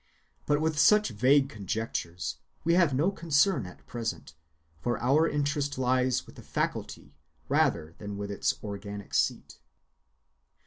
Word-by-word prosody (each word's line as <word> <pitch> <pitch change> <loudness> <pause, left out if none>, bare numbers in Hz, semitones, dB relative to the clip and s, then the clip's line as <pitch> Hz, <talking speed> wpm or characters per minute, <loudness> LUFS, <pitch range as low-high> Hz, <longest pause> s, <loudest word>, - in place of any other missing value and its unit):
But 145 0 +3
with 155 -1 0
such 210 +5 +5
vague 130 +6 +4
conjectures 100 -6 -4 0.3
we 170 - +3
have 170 -4 +4
no 150 +9 +2
concern 165 - +2
at 90 - -14
present, 115 -9 -5 0.5
for 120 +10 -1
our 145 +7 +3
interest 145 -1 -1
lies 130 0 +1
with - - -15
the - - -9
faculty 70 - -3 0.3
rather 80 +1 +1
than 100 -1 -6
with 100 0 -4
its 100 - 0
organic 100 -1 -7
seat. - - 0
130 Hz, 135 wpm, -29 LUFS, 100-145 Hz, 0.5 s, such